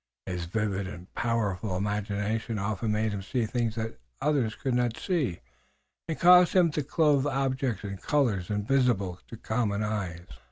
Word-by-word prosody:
His 90 -2 -3
vivid 100 0 -1
and 90 -1 -10
powerful 105 -5 -1
imagination 105 +2 -2
often 105 +2 -1
made 110 +1 +1
him 100 -1 -3
see 115 +4 -1
things 115 0 -1 0.4
others 135 -8 +1
could 130 - -2
not 120 -1 +1
see 150 - -1 0.7
and 160 - -2
caused 180 0 +7
him 175 -3 +5
to 150 - -1
clothe 145 -1 +2
objects 135 -5 -1
in 100 -1 -5
colors 110 - 0
invisible 105 -4 +1
to 115 - -9
common 110 -2 -1
eyes. 95 -5 -3
110 Hz, 150 wpm, -28 LUFS, 100-130 Hz, 0.7 s, caused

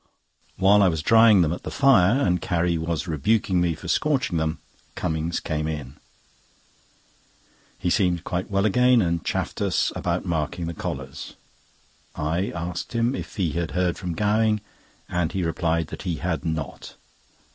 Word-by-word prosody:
While 100 +2 +5
I 100 - +5
was 80 -3 -1
drying 110 -3 +6
them 80 0 0
at - - -6
the - - -6
fire, 125 -4 +4
and 90 -1 +1
Carrie 85 0 0
was 80 -1 -2
rebuking 90 +4 +1
me 85 -2 +1
for - - -10
scorching 135 - +1
them, 80 0 -1 0.4
Cummings 80 +1 -2
came 75 -1 -2
in. 75 -4 -6 1.8
He 90 - -1
seemed 90 -4 +1
quite 90 +2 -3
well 100 0 +1
again, 125 +2 +4
and 85 -1 -1
chaffed - - -3
us - - +1
about - - -2
marking 80 +1 -2
the 85 - -4
collars. - - -6 0.8
I 80 +6 -1
asked 85 +4 -5
him 115 +2 +1
if - - -6
he 90 -7 0
had 85 +1 -2
heard 90 -2 +1
from 90 -2 -5
Gowing, 105 +2 +2 0.5
and 90 -3 -1
he 95 - -1
replied 80 -1 0
that - - -7
he 90 -4 -2
had 80 -1 -3
not. 80 -4 -5
85 Hz, 160 wpm, -24 LUFS, 80-100 Hz, 1.8 s, drying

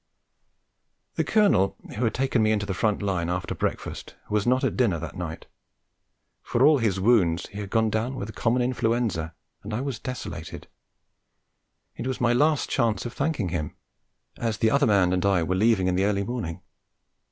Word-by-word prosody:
The - - 0
Colonel 120 - +3 0.2
who 115 - -2
had 110 - 0
taken 130 -2 +1
me 110 0 +3
into 105 -1 0
the 100 - -2
front 105 +2 0
line 90 -4 -1
after 90 +1 -2
breakfast - - -4 0.2
was 105 +1 +1
not 130 +1 +3
at - - 0
dinner 115 -10 +2
that 85 0 -7
night; 85 -3 -6 1.0
for 120 - 0
all 150 -1 +6
his 105 -5 0
wounds 95 -6 +3
he 100 - -8
had 100 -2 -5
gone 110 0 +2
down 115 +5 -1
with 110 -4 -5
common 120 +2 +1
influenza, 115 -9 -1 0.3
and 105 +2 -5
I 120 - -2
was 135 -5 -4
desolated. 115 - -7 1.3
It 120 - -5
was 130 - -2
my 120 -1 +3
last 150 +3 +2
chance 115 -4 0
of 120 - -5
thanking 140 - -1
him, 80 -3 -3 0.6
as 115 -2 -2
the 110 0 +2
other 140 0 +3
man 95 -4 +3
and 90 -1 0
I 95 -4 +3
were 90 - -1
leaving 105 0 +3
in 90 - +1
the 95 +2 +2
early 100 -1 +1
morning. 100 -7 -5
110 Hz, 185 wpm, -25 LUFS, 95-120 Hz, 1.3 s, all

